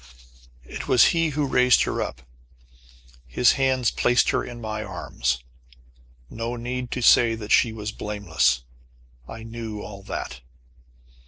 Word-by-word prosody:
It - - -7
was 125 -2 +6
he 165 -1 +1
who 150 - +2
raised 125 -2 +4
her - - -2
up. 65 - -5 1.0
His 120 - +4
hands 130 -3 +1
placed 125 0 +2
her - - 0
in 120 -1 -8
my 110 -1 -4
arms. 65 - -3 0.8
No 115 - -5
need 125 +1 -4
to 125 - -3
say 115 0 +5
that 110 -2 -8
she 115 - +4
was 105 -1 -5
blameless. 90 -12 0 0.6
I 115 - -9
knew 115 -2 -6
all 100 -1 -9
that. 70 -8 -6
115 Hz, 140 wpm, -24 LUFS, 100-125 Hz, 1.0 s, was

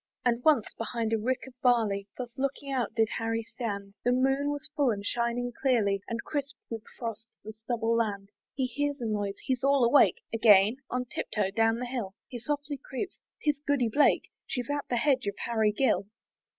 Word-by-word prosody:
And 240 0 +2
once, 295 -9 +5
behind 230 -1 -1
a 225 - +2
rick 255 +4 -1
of 265 - -12
barley, 220 -6 +2
Thus 245 -2 -6
looking 275 +1 -2
out 250 -5 -1
did 225 -1 +4
Harry 225 0 -1
stand; 200 -4 -5
The 245 - +3
moon 270 +3 +2
was 290 -1 -4
full 285 -4 +3
and 205 -3 -2
shining 240 +2 0
clearly, 215 -7 +2
And 230 0 -3
crisp 280 -2 -3 0.2
with 225 -1 -3 0.2
frost 225 -2 -5
the 215 - -7
stubble 225 +1 -1
land. 200 -3 -1 0.3
He 265 - +1
hears 285 +3 -2
a 240 - -3
noise 205 -2 -1
he's 260 -1 -1
all 275 -1 +4
awake 245 +4 +5
Again? 215 0 +6
on 250 0 -1
tip - - -5
toe 200 -2 0
down 225 +2 +3
the 250 - -3
hill 235 -6 -4
He 245 - -6
softly 285 +3 -3
creeps 360 +9 -5 0.2
'Tis 295 -2 +2
Goody 280 -5 +1
Blake, 290 +6 +3 0.2
She's 245 +1 -3
at 290 0 -2
the 245 - +1
hedge 260 -3 +2
of 200 - -1
Harry 220 -2 +2
Gill. 210 -3 +1
235 Hz, 195 wpm, -29 LUFS, 220-270 Hz, 0.3 s, Again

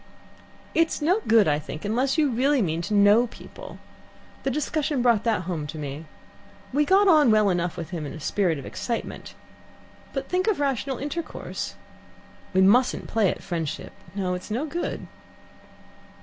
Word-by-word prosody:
"It's 330 0 +2
no 355 +8 +2
good, 220 -5 +5
I 145 -1 +2
think, 155 +2 -7
unless 255 +8 +1
you 300 -4 +3
really 270 +4 +2
mean 165 -6 0
to 200 +5 -3
know 205 +4 +6
people. - - -11 0.6
The - - -1
discussion 295 -1 -1
brought 235 -4 +3
that 215 -5 +1
home 165 -4 -3
to 155 - -7
me. 145 +1 -6 0.7
We 295 +2 +3
got 390 +5 +5
on 305 -7 +6
well 215 -2 +4
enough 175 -1 -1
with 170 +1 -6
him 160 -5 -4
in - - -7
a 160 - -8
spirit 175 0 0
of 135 - -8
excitement, 235 -2 -5 0.8
but - - -4
think 370 +3 0
of 430 -7 +2
rational 270 -2 -1
intercourse. 310 +4 -5 0.8
We 190 - +3
mustn't 240 +7 +4
play 220 -4 +2
at - - -5
friendship. 165 -5 -4 0.2
No, 185 -2 -1
it's 180 +3 -6
no 240 +8 -1
good." 340 +3 -4
220 Hz, 165 wpm, -25 LUFS, 175-285 Hz, 0.8 s, know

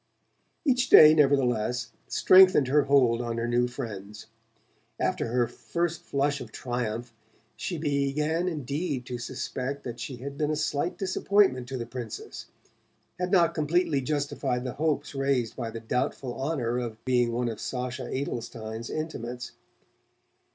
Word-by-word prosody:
Each 260 -2 +2
day, 155 0 +10
nevertheless, 125 -5 +2 0.2
strengthened 185 -8 +6
her 145 +1 +4
hold 125 -4 +4
on 115 -1 -3
her 115 0 -1
new 120 +1 +2
friends. 105 -4 -7 0.7
After - - 0
her 120 +1 +1
first 170 +4 -3
flush 140 0 -1
of 115 -3 -9
triumph 120 -1 -4 0.4
she 175 - -4
began 150 +3 0
indeed 145 -3 -3
to 125 -1 -5
suspect 130 +2 -4
that 120 -1 -6
she 135 - -5
had 140 +3 -8
been 150 -1 +1
a 155 - +1
slight 150 +2 -1
disappointment 190 -8 +2
to 130 0 -4
the 120 - -4
Princess, 120 -2 -7 0.7
had 180 0 -1
not 175 -4 +4
completely 155 -1 +1
justified 140 -2 -1
the 125 - -4
hopes 155 -2 0
raised 135 -5 0
by 120 -3 -4
the 115 0 -6
doubtful 125 +2 -2
honour 130 -4 -1
of 115 -3 -6
being 125 -2 +2
one 120 +1 -1
of 115 -2 -4
Sacha 125 0 -4
Adelschein's 115 -4 -5
intimates. 125 -6 -5
130 Hz, 145 wpm, -27 LUFS, 120-150 Hz, 0.7 s, day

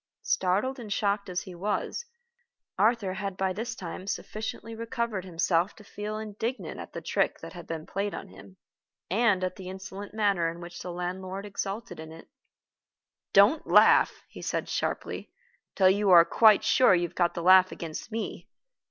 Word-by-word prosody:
Startled 205 +9 0
and 220 -4 -8
shocked 200 0 0
as 180 -1 -2
he 185 - -10
was, 205 - -2 0.7
Arthur 215 -4 +2
had 195 -1 -4
by 190 -1 0
this 230 +5 -4
time 185 0 -7
sufficiently 220 +2 -5
recovered 230 -3 -3
himself 175 +1 +1
to 215 - -15
feel 210 +1 -5
indignant 220 +3 -4
at - - -9
the - - -5
trick - - 0
that - - -9
had 175 -2 -10
been 160 -1 -5
played 200 +1 -3
on - - -7
him, 95 0 -15 0.5
and 205 -3 +3
at 185 0 -2
the 185 -2 -7
insolent 190 +1 -8
manner 200 -6 +1
in 170 +1 -8
which 175 0 -9
the 180 - -5
landlord 185 +2 -5
exulted 200 -2 -5
in 160 0 -8
it. 165 0 -12 1.0
"Don't 205 +11 +5
laugh," - - +5
he - - -11
said - - -2
sharply, - - -3 0.4
"till 190 -1 +5
you 200 +1 +1
are 170 -2 +9
quite 215 +1 +5
sure 215 -1 +5
you 175 0 +1
have - - -19
got 175 -1 +1
the 170 - -3
laugh 185 +1 +7
against 165 +6 -7
me. 225 0 -5
195 Hz, 175 wpm, -28 LUFS, 180-215 Hz, 1.0 s, are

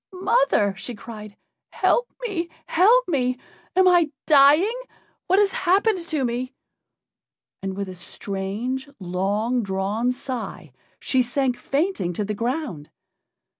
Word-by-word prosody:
mother!" 340 - +3
she 230 +6 -6
cried, 215 -2 -10 0.3
"help 485 - +1 0.2
me! 345 -5 -3 0.2
help 460 +9 +4
me! 255 -6 0 0.4
Am 375 0 +5
I 350 -3 +5 0.2
dying? 300 +8 +6 0.5
What 380 +1 +3
has 405 -1 +4
happened 385 +3 +2
to 305 -5 0
me?" 250 +2 -3 1.1
And, 195 0 -4
with 200 -1 -3
a 185 - -7
strange, 200 +8 -4
long 200 +7 -1
drawn 200 +4 -1
sigh 240 - -6 0.3
she 260 - +1
sank 250 +1 0
fainting 275 - -1
to 205 +4 -2
the 210 - -2
ground. 230 - -3
250 Hz, 125 wpm, -23 LUFS, 200-335 Hz, 1.1 s, dying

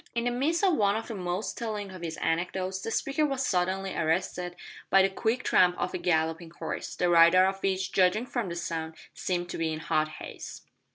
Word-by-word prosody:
In 235 - 0
the 245 - +1
midst 300 +9 0
of 380 -3 +4
one 200 -1 +3
of 225 - -3
the - - -3
most 185 +1 -3
telling 210 -4 -4
of 185 -2 -9
his 165 -2 -4
anecdotes 185 +3 -1
the - - -4
speaker 275 +6 0
was 275 -3 0
suddenly 190 +1 0
arrested 175 +2 -1 0.3
by 195 0 +6
the 195 - +3
quick 225 +5 -1
tramp 180 -1 +4
of 180 - -2
a - - -2
galloping 165 0 0
horse, 170 - -5
the 180 - +1
rider 170 +2 +7
of 195 0 -1
which, 190 0 0
judging 190 +5 +3
from 240 -6 -3
the 170 - -4
sound, 160 -1 -4 0.2
seemed 175 -1 -2
to - - -5
be 165 -1 0
in 155 - -3
hot 155 -1 +1
haste. 155 - -9
185 Hz, 215 wpm, -28 LUFS, 170-215 Hz, 0.3 s, rider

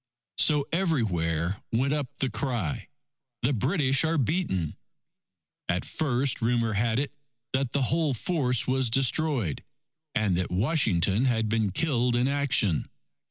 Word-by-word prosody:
So 150 -2 +4
everywhere 95 - 0
went 130 +5 +1
up 145 -3 -1
the 135 - -1
cry, 115 - -2 0.6
"The 135 +4 +2
British 135 - +1
are 160 +1 +1
beaten!" 125 - -1 0.9
At 90 +1 0
first, 135 -3 -1
rumour 115 -1 +1
had 110 +2 +1
it, 140 +2 -1 0.4
that 130 -2 0
the 140 - 0
whole 155 0 +1
force 125 -4 0
was 130 -2 +1
destroyed, 135 - +1 0.5
and 105 -4 +1
that 90 - -2
Washington 105 - +1
had 110 -4 +1
been 110 -2 +1
killed 125 - +1
in 120 +2 +2
action. 135 - +1
125 Hz, 130 wpm, -27 LUFS, 105-140 Hz, 0.9 s, So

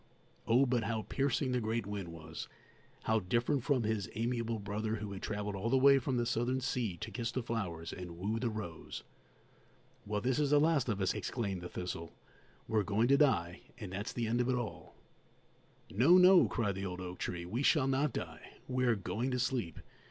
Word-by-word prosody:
Oh, 125 +4 +5
but 125 -3 +1
how 110 -1 -1
piercing 135 +1 0
the 125 -1 +1
great 110 0 -1
wind 100 -3 -4
was; 80 -1 -8 0.6
how 110 0 +2
different 120 +7 0
from 130 -3 +2
his 105 -2 -1
amiable 115 0 -1
brother 105 +2 -2
who 105 -2 -5
had 95 - -6
travelled 105 -1 -3
all 100 +4 -2
the 130 - +4
way 135 +1 +7
from 130 0 -1
the 120 - +1
Southern 120 +3 0
sea 125 -8 -2
to - - -6
kiss 115 -1 -2
the 130 +1 -2
flowers 90 -9 -3
and 90 -2 -7
woo 105 +5 -1
the 120 0 0
rose! 105 -7 -6 1.0
"Well, 105 0 0
this 125 +5 0
is 145 -2 +2
the 145 0 +5
last 150 -5 +2
of 100 -3 -1
us!" 95 - +2
exclaimed 100 -2 -3
the 90 - -6
thistle; 85 -2 -5 0.5
"we're 110 -1 +2
going 105 +4 +1
to 140 - +6
die, 90 - +2 0.2
and 105 -6 -7
that's 100 +4 -3
the 120 - -2
end 120 +2 +1
of 125 - 0
it 130 - +2
all!" 120 -3 -5 1.0
"No, 135 - +6
no," 185 0 +7
cried 105 -4 0
the 95 +1 -4
old 90 0 -5
oak 90 -1 -6
tree; 85 -1 -3
"we 110 +9 -2
shall 145 -1 +4
not 135 +3 +2
die; 80 -2 -7
we 125 0 0
are 120 -2 +4
going 110 +5 -2
to 125 - 0
sleep. 125 - -1
115 Hz, 205 wpm, -33 LUFS, 100-125 Hz, 1.0 s, way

